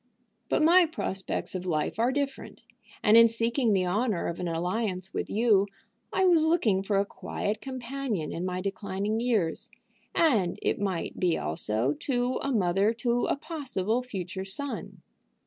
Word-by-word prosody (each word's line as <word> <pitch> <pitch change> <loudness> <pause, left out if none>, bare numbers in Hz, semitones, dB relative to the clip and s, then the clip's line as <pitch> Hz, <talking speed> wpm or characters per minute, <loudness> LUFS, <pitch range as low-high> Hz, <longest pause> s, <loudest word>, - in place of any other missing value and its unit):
But - - +2
my 345 +2 +6
prospects 195 -11 -3
of 185 -1 -4
life 155 +4 -1
are 240 +3 +3
different, 275 0 -4 0.4
and 210 - +6
in 230 0 +9
seeking 230 +1 +1
the 190 -2 +2
honor 210 +1 0
of 170 - -3
an 180 - -2
alliance 185 +3 -2
with - - -3
you 210 -2 +3 0.4
I 380 - +2
was 340 -4 +5
looking 245 - +2
for 200 0 0
a 200 - +2
quiet 210 +1 -4
companion 260 - -4
in 170 - -4
my 185 0 -2
declining 200 +2 -2
years, 220 -9 0 0.5
and 220 - +3
it - - 0
might 190 -4 -2
be 175 -3 +2
also 110 - -1
to 245 - -1
a 275 - -1
mother 195 -1 +2
to 240 +1 0
a - - +1
possible 260 - -2
future 190 -6 -5
son. 265 +9 -6
210 Hz, 160 wpm, -28 LUFS, 185-250 Hz, 0.5 s, in